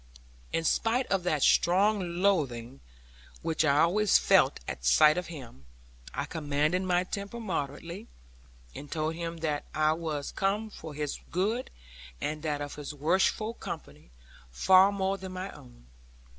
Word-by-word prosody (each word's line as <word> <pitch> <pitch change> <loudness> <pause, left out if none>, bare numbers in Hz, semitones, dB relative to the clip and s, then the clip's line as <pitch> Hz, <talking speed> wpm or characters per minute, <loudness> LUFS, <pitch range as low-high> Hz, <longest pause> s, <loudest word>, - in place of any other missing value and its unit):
In 165 - 0
spite 230 +9 +1
of 195 -1 +2
that 155 -5 +1
strong 185 -1 +3
loathing 135 -10 0 0.6
which 160 0 +1
I 145 -1 +4
always 205 +4 +4
felt - - +4
at - - -5
sight 65 - +6
of 180 0 -3
him, 125 - -10 0.5
I 140 - -3
commanded 150 +2 0
my 180 -1 +1
temper 200 +4 -6
moderately, 170 0 -4 0.7
and 145 - -9
told 155 0 -1
him 165 0 -5
that 150 -2 -1
I 155 0 +3
was 155 -3 -4
come 205 +3 -1
for 160 -6 -9
his 150 -1 -3
good, 215 +8 -1 0.5
and 150 - -3
that 150 -2 -2
of 145 0 -5
his 150 0 -6
worshipful 190 +8 +1
company, - - -8 0.4
far 190 - +5
more 195 0 -1
than 190 - -7
for 185 - -5
my 190 +2 -5
own. - - -16
165 Hz, 150 wpm, -29 LUFS, 145-190 Hz, 0.7 s, sight